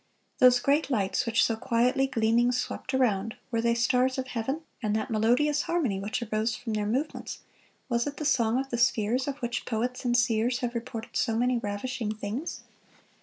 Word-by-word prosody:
Those 250 -1 +7
great 285 +5 +1
lights, 215 -1 0
which 230 0 +3
so 225 - +1
quietly 245 +4 +1
gleaming 235 0 +2
swept 250 +1 -3
around, 225 -4 +1 0.2
were 230 -1 +1
they 235 0 +2
stars 250 +2 +2
of 260 0 -3
heaven, 260 +7 -2 0.2
and 215 -2 0
that 220 +3 -2
melodious 250 +7 +2
harmony 275 - 0
which 210 +4 -3
arose 220 +1 -1
from 230 -3 -5
their 210 -1 -1
movements, 265 +8 -3 0.5
was 235 0 0
it 285 - -5
the 305 - -4
song 240 -4 +2
of 270 0 -4
the 240 - -1
spheres, 240 +1 +2
of 280 -1 -3
which 240 0 -2
poets 245 +2 -2
and 245 -1 +2
seers 240 +1 +1
have 245 -1 -2
reported 230 -1 -6
so 225 -3 +1
many 245 +1 +2
ravishing 215 +2 -3
things? 215 +9 -5
240 Hz, 185 wpm, -28 LUFS, 225-255 Hz, 0.5 s, Those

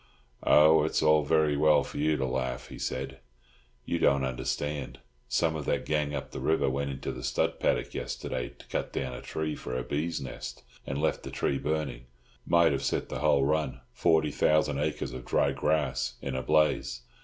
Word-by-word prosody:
"Oh, 75 +1 +6
it's 80 - 0
all 75 -1 +5
very 75 0 +3
well 75 -1 +4
for - - -7
you 75 +1 +2
to 65 - 0
laugh," 65 -1 -3
he - - -9
said; 65 +1 -4 0.7
"you 85 - -1
don't 70 -3 +3
understand. 70 +2 -3 0.3
Some 80 -2 +1
of 75 -3 -4
that - - 0
gang 75 -1 0
up 70 - -5
the - - -5
river 80 -4 +2
went 70 +1 -2
into 65 -1 -4
the 60 - -7
stud 65 0 0
paddock - - 0
yesterday 65 -2 -4
to - - -17
cut - - -3
down 65 -2 -2
a - - -7
tree 80 -1 -3
for 65 - -5
a 65 - -2
bee's 80 +4 -2
nest, 65 - -7 0.2
and 70 - -2
left 80 - 0
the - - -7
tree 70 - -1
burning; 70 -5 -3 0.4
might 85 -1 +5
have - - -1
set - - -1
the - - -4
whole 75 -3 +3
run—forty 80 +1 +1
thousand 75 -2 +2
acres 75 -4 -2
of 65 -1 -6
dry - - +2
grass—in 75 -3 -1
a 65 - -1
blaze. 75 +1 +2
75 Hz, 190 wpm, -29 LUFS, 65-75 Hz, 0.7 s, Oh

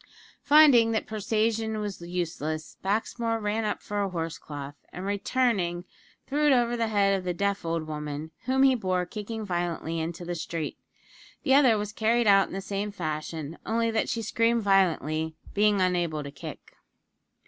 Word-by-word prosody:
Finding 280 -7 +6
that 220 - 0
persuasion 220 +1 0
was 205 -4 -4
useless, 165 -3 -4
Baxmore 225 +3 -1
ran 215 +1 -1
up 210 - -2
for 205 0 -2
a 200 - 0
horse 165 -3 -4
cloth, 145 -1 -7 0.2
and, 180 - -6
returning, 200 -4 0 0.4
threw 295 +3 +1
it - - +6
over 240 -2 +3
the 230 -1 0
head 200 -2 +3
of 190 - -3
the 180 -1 -2
deaf 200 +1 0
old 165 -1 -2
woman, 150 0 -5
whom 265 +1 +3
he 270 -1 +6
bore, 185 -6 0
kicking 215 +3 -6
violently, 175 -3 -2
into 165 +2 -4
the 175 - -3
street. 165 -1 -4 0.6
The 265 - +3
other 260 -5 +6
was 210 0 -4
carried 230 +2 +2
out 195 -2 +6
in - - -10
the 195 - -3
same 200 +1 -3
fashion 155 -3 -5
only 230 0 0
that 220 - 0
she 230 - -2
screamed 230 +1 +1
violently, 160 -5 +2 0.2
being 205 0 +3
unable 175 -4 0
to 140 - -7
kick. - - -10
200 Hz, 170 wpm, -27 LUFS, 170-225 Hz, 0.6 s, Finding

